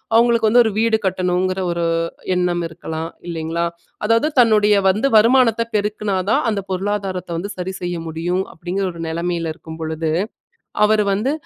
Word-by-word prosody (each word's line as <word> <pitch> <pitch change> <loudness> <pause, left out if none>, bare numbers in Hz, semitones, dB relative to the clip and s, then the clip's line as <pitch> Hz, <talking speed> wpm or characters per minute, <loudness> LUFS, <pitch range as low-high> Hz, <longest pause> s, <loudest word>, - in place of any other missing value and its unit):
அவுங்களுக்கு 230 -1 +4
வந்து 245 +1 +7
ஒரு 220 - +1
வீடு 230 -1 +3
கட்டணுங்கிற 185 0 0
ஒரு 170 0 -1 0.5
எண்ணம் 175 -1 0
இருக்கலாம் 160 0 -5 0.2
இல்லைங்களா? 165 0 -2 0.4
அதாவது 230 +6 +3
தன்னுடைய 215 -3 +5
வந்து 210 +8 +3
வருமானத்த 230 +1 +5
பெருக்குனாதான் 210 -1 0
அந்த 205 -2 -1
பொருளாதாரத்த 190 -1 -2
வந்து 200 +4 -4
சரி 185 +1 -3
செய்ய 175 0 -3
முடியும். 170 +3 -1
அப்டிங்கிற 180 +4 -3
ஒரு 170 - -12
நெலமைல 170 0 -2
இருக்கும் 160 -1 -10
பொழுது, 160 0 -2 0.8
அவரு 210 0 +3
வந்து 220 +8 0
185 Hz, 140 wpm, -20 LUFS, 170-215 Hz, 0.8 s, வந்து